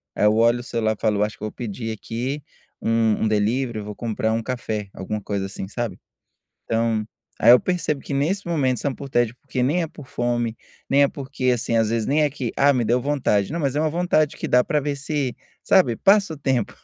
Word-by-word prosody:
aí - - +2
eu 105 +1 +5
olho 115 +2 +4
o - - -7
celular 110 -3 -1
e - - -26
falo: 105 -2 +2
"Acho 105 - -3
que - - -11
eu - - -1
vou - - -8
pedir 115 -1 -5
aqui 130 +7 -4 0.4
um 115 -1 +2
um - - +3
delivery, 110 +3 0
eu 105 - -7
vou 105 -1 -7
comprar 110 -1 -1
um 115 0 -1
café", 110 -5 -3
alguma 105 +3 -4
coisa, 100 -1 -2
assim, 95 -1 -6
sabe? 120 +1 -3 0.7
Então, 115 -1 0 0.4
aí 115 - +7
eu 125 - +7
percebo 165 -5 -1
que 140 - -5
nesse 170 +9 0
momento 135 -7 +1
são 140 -2 -1
por 140 - -8
tédio 120 -2 +1
porque 130 -2 -3
nem 155 +8 +2
é - - -1
por 150 -3 -12
fome, 120 -1 -1 0.3
nem 140 +1 +4
é - - +3
porque, 135 -4 -2
assim, 115 -1 0
às 110 -1 +3
vezes 115 -2 0
nem 150 +2 +2
é 150 - +2
que, 130 -4 -4
ah 140 +1 +5
me 125 -3 +1
deu 120 +3 +2
vontade, 135 -8 +1
não 170 - -2
mas 140 -3 0
é - - +2
uma 155 0 +1
vontade 165 -3 +1
que - - -4
dá 125 0 +5
para 150 -3 +1
ver 145 0 -2
se, 140 -2 -2 0.3
sabe 175 -12 +4
passa 195 -4 +4
o - - -12
tempo, 130 -6 0
120 Hz, 240 wpm, -23 LUFS, 110-145 Hz, 0.7 s, aí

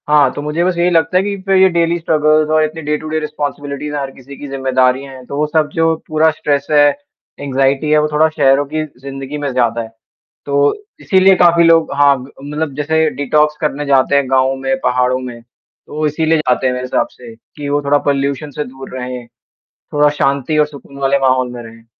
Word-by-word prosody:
हाँ, 145 -3 +4
तो - - -5
मुझे 150 +3 -1
बस 180 -1 0
यही 175 +1 +2
लगता 165 +1 +2
है - - +4
कि 200 0 -2
फिर 195 -1 +2
ये 190 0 +6
डेली 170 -1 +1
स्ट्रगल्स 155 -1 +2
और 155 0 +3
इतनी 155 +1 -4
डे 150 0 -1
टू 155 - -9
डे 155 0 -1
रिस्पॉन्सिबिलिटीज़ 145 -1 -5
हर 140 -2 -3
किसी 135 +1 -13
की 145 - -8
ज़िम्मेदारियाँ 130 0 0
हैं, 130 -1 -12
तो 140 - -6
वो 150 - +1
सब 155 -1 0
जो 165 -2 +2
पूरा 155 +1 +3
स्ट्रेस 145 -2 -2
है, 145 -1 +6 0.5
एंग्जायटी 135 +1 0
है 155 - +5
वो 150 - +1
थोड़ा 155 +1 +3
शहरों 145 -2 +2
की 155 0 0 0.2
ज़िंदगी 135 +1 -7
में 145 -2 -3
ज़्यादा 120 -2 0
है। 115 - -7 0.6
तो 140 0 +2 0.3
इसीलिए 190 0 +4
काफ़ी 170 -1 +4
लोग 165 -1 +4
हाँ 140 0 +5
ग - - -12 0.2
मतलब 150 0 -4
जैसे 160 +2 +1
डिटॉक्स 150 +2 +1
करने 150 -1 -2
जाते 140 0 +2
हैं 140 -2 +1
गाँव 130 0 +2
में 135 0 -1
पहाड़ों 125 0 +1
में। 125 -2 -8
तो 120 +4 -19
वो 155 0 -1
इसीलिए 160 +2 +1
जाते 130 -4 0
हैं 125 - 0
मेरे 125 0 -4
हिसाब 130 - 0
से 120 -2 -13
कि 145 +5 -9
वो 145 +1 0
थोड़ा 145 +1 +3
पोल्यूशन 140 +1 -1
से 150 - -4
दूर 130 0 -10
रहे। 125 -1 -6 0.5
थोड़ा 150 0 0
शांति 140 +3 0
और 150 - +4
सुकून 140 -1 -13
वाले 140 0 +1
माहौल 130 -2 +1
में 120 -1 -8
रहें। 115 0 -14
145 Hz, 215 wpm, -16 LUFS, 135-155 Hz, 0.6 s, ये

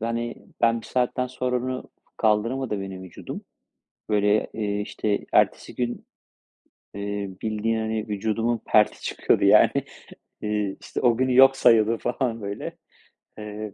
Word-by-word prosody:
hani, 115 +1 -2 0.3
ben 115 0 +3
1 - - -13
saatten 125 0 0
sonra 125 0 -2
onu 130 +1 -4 0.3
kaldıramadı 110 +1 0
beni 95 -1 -6
vücudum. 90 -2 -8 0.7
Böyle, 105 0 +2
eee, 105 -2 -2
işte, 105 0 -2
ertesi - - +2
gün, 120 -1 -3 0.9
eee, 100 0 -4
bildiğin, 110 +1 -1
hani, 110 0 -2
vücudumun 110 +3 0
perti 105 -1 +3
çıkıyordu, - - +1
yani. - - +7 0.7
Eee, 105 -2 -1
işte, - - -5
o 120 -2 +4
günü 130 0 +1
yok 135 +1 +8
sayıyordum, 115 -1 +4
falan, 120 -2 -2
böyle. 100 0 -5 0.6
Eee, 105 -1 -6
110 Hz, 130 wpm, -25 LUFS, 105-120 Hz, 0.9 s, yok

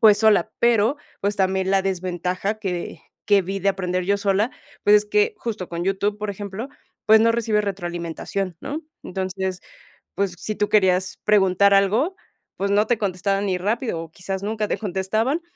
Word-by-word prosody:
pues, 210 -2 +7
sola, 220 0 +4
pero, 235 +3 +3 0.3
pues, 200 +1 0
también 190 0 +1
la 195 0 +4
desventaja 185 +2 -2
que 180 -5 -4 0.2
que 205 -1 +5
vi 195 +2 -3
de 200 +1 +1
aprender 185 -1 -2
yo 200 +2 +2
sola, 200 +3 +1 0.3
pues, 205 - +6
es 210 - +2
que 420 - +2
justo 215 -6 -4
con 170 +1 -3
YouTube, 200 +2 0
por 210 0 -4
ejemplo, 205 +5 -6 0.4
pues, 220 +1 +8
no 230 0 +4
recibes 220 -2 +1
retroalimentación, 175 -1 -4
¿no?, 305 +3 -5 0.2
entonces, 190 0 -3 0.5
pues, 195 -2 0
si 215 - -4
tú 210 - -1
querías 190 -2 +2
preguntar 200 -1 +4
algo, 220 - +2 0.4
pues 200 +1 -1
no 210 +2 +3
te 240 - +2
contestaban 195 0 -1
ni 185 -2 0
rápido 210 -1 -1
o 165 -1 -8
quizás 190 +3 -5
nunca 215 +1 -1
te - - -1
contestaban, 215 - -1
200 Hz, 175 wpm, -23 LUFS, 185-215 Hz, 0.5 s, pues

